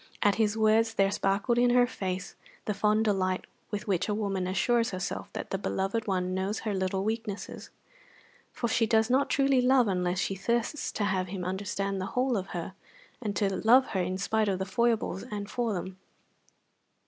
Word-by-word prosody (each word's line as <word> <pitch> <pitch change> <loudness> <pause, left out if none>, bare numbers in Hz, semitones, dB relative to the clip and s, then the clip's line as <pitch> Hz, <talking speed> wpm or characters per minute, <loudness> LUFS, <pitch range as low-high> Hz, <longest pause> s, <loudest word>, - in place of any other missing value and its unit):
At 205 - +5
his 215 0 +1
words 220 +1 +3
there 195 -1 +3
sparkled 200 +5 +1
in 245 0 +4
her 245 0 +6
face 190 -6 -4 0.3
the 210 - 0
fond 210 +2 +2
delight 185 -3 0 0.2
with 210 0 -4
which 185 0 0
a 210 - +1
woman 195 -3 -1
assures 230 +5 +2
herself 185 0 -4
that - - -6
the 195 - -1
beloved 200 +3 -2
one 185 -2 0
knows 190 +3 -2
her 215 -2 -2
little 190 0 -1
weaknesses, 220 -2 -4 0.8
for 235 - -2
she 225 0 +2
does 220 +2 +3
not 270 +2 +3
truly 275 -2 +3
love 250 -1 +4
unless 180 -2 0
she 185 - 0
thirsts 235 +8 -1
to 210 - -1
have 190 -2 0
him 180 -1 -5
understand 195 +1 -2
the 190 - -3
whole 255 0 +2
of 195 -2 -2
her, 175 0 -5 0.5
and 210 -4 -3
to 195 -2 0
love 250 +4 +5
her 190 - 0
in 185 +1 -2
spite 215 +2 +1
of 190 - 0
the 190 - -2
foibles 220 -1 0
and 205 -1 -5
for 240 -2 -1
them. 185 0 -5
205 Hz, 190 wpm, -29 LUFS, 190-225 Hz, 0.8 s, her